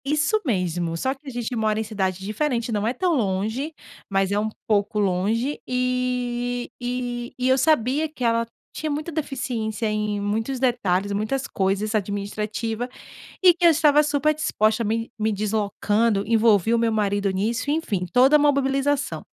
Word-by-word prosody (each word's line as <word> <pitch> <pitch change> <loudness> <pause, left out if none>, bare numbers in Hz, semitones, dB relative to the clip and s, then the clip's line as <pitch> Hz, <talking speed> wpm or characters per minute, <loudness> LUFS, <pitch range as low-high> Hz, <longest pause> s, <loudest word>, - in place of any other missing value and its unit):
Isso 305 +10 +1
mesmo! 175 - -1
Só 260 +10 0
que, 280 +2 -20
a - - -4
gente 240 0 -3
mora 215 -1 +1
em - - 0
cidade 190 -4 -2
diferente. 235 +2 -1
Não 210 0 0
é 240 - +1
tão 345 +5 +1
longe, 220 +7 -1 0.4
mas, 195 -1 +1
é 205 - +2
um 215 +1 -1 0.2
pouco 210 0 +1
longe. 210 +8 0
Eh 250 -1 -1 0.2
eh, 245 -1 -3
e 250 0 0
eu 260 0 +4
sabia, 295 +1 +2
que 290 -4 -8
ela 230 0 +2 0.3
tinha 310 - -3
muita 300 +3 -3
deficiência 250 -8 -3
em 210 -1 -1
muitos 225 +6 -2
detalhes, 205 -7 +1
muitas 215 +7 -1
coisas 200 +2 -1
administrativa. 215 +3 -2 0.5
E 360 -2 +8
que 345 +1 -2
eu 340 - +9
estava, 300 -2 +5
super 295 +1 +1
disposta. 225 -7 +1
Me-me 220 0 -1
deslocando. 210 0 0
Envolvi 225 -1 +3
o - - +3
meu 230 -1 +1
marido 205 -2 +1
nisso. 225 +8 -1
Enfim, 240 - -1
toda 265 +4 +6
mobilização. 280 0 +1
230 Hz, 160 wpm, -23 LUFS, 210-270 Hz, 0.5 s, eu